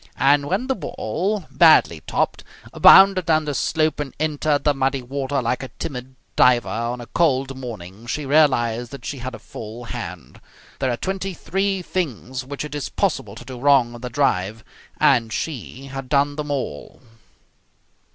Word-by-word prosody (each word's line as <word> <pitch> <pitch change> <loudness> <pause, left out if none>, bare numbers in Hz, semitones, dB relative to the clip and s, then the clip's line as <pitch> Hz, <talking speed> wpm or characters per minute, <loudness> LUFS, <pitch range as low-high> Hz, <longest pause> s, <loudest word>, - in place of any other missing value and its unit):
And 140 +1 +3
when 195 - 0
the 265 - 0
ball, 190 - -3
badly 155 - +5
topped, - - -1 0.3
bounded 190 -3 +7
down 155 -1 +3
the 145 - -2
slope 155 +3 0
and 145 -3 -5
entered 150 -1 0
the 150 - +3
muddy 135 -1 -1
water 135 +1 -2
like 120 +2 -1
a 130 - -5
timid 130 -2 -6 0.2
diver 125 -2 +4
on 115 +2 -3
a 120 - -7
cold 135 -1 +1
morning 110 -4 -9
she 145 +4 -3
realized 120 -5 +2
that 135 -3 -9
she 140 - -5
had 125 0 -5
a - - -8
full 115 +2 -9
hand. 90 -6 -8 0.4
There 130 - 0
are 120 - -2
twenty 190 +2 -3
three 195 +2 -1
things 130 - -3
which 140 +3 -6
it 150 - -8
is 145 -3 -4
possible - - -1
to - - -11
do 130 -2 -8
wrong 135 -3 +4
in 120 - -10
the 125 - -5
drive, 110 -5 0 0.4
and 115 -5 +3
she 135 -1 -5
had 135 -1 -7
done 145 0 +2
them 150 -1 -5
all. 130 - -4
135 Hz, 170 wpm, -22 LUFS, 120-150 Hz, 0.4 s, bounded